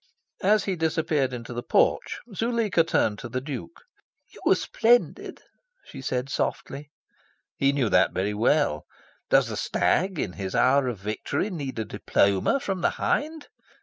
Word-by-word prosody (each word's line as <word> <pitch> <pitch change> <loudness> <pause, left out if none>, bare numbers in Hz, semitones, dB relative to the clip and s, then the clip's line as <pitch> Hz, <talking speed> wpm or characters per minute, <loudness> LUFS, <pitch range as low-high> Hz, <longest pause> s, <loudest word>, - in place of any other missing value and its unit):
As 210 +1 +3
he 195 - -1
disappeared 160 -4 0
into 120 0 -7
the 120 - -4
porch, 485 - +1
Zuleika 225 -4 +1
turned 110 -9 0
to 120 - -7
the 125 - -2
Duke. 145 - -8 0.5
"You - - -14
were - - +6
splendid," 240 +2 +1 0.4
she 135 - -10
said 125 0 -2
softly. 140 +1 -3 0.7
He 140 0 +2
knew 140 -4 0
that - - +3
very 100 +3 -1
well. 105 - +1 0.4
Does - - +4
the - - -4
stag 185 0 +1
in 90 - -2
his 95 -2 -5
hour 130 +1 +3
of 120 -3 -3
victory 105 - -3
need 140 -8 -5
a 110 - -2
diploma 100 - +1
from 195 -7 -3
the - - +3
hind? 310 +1 -1
140 Hz, 155 wpm, -25 LUFS, 120-190 Hz, 0.7 s, were